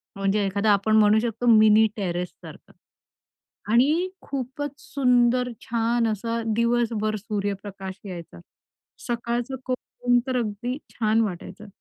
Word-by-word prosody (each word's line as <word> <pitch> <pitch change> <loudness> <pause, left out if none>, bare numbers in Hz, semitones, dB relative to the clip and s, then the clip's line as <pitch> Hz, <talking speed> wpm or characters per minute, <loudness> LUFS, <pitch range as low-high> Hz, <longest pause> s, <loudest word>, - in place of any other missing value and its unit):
म्हणजे 195 +1 +1
एखादा 200 +2 +1
आपण 215 +2 +2
म्हणू 215 0 +5
शकतो 235 +1 -3
मिनी 215 0 +6
टेरेससारखं 180 -3 -6 1.0
आणि 305 +10 +3
खूपच 275 +1 -4
सुंदर 250 -2 +2
छान 230 0 0
असा 230 +2 -2
दिवसभर 230 -2 +1
सूर्यप्रकाश 200 -2 -5
यायचा. 170 - -8 0.7
सकाळचं 240 +2 -2
कोवळं 250 -1 -4
ऊन 245 - +6
तर 255 -1 0
अगदी 240 +3 -3 0.2
छान 220 0 +2
वाटायचं 200 +1 -5
225 Hz, 110 wpm, -24 LUFS, 205-245 Hz, 1.0 s, मिनी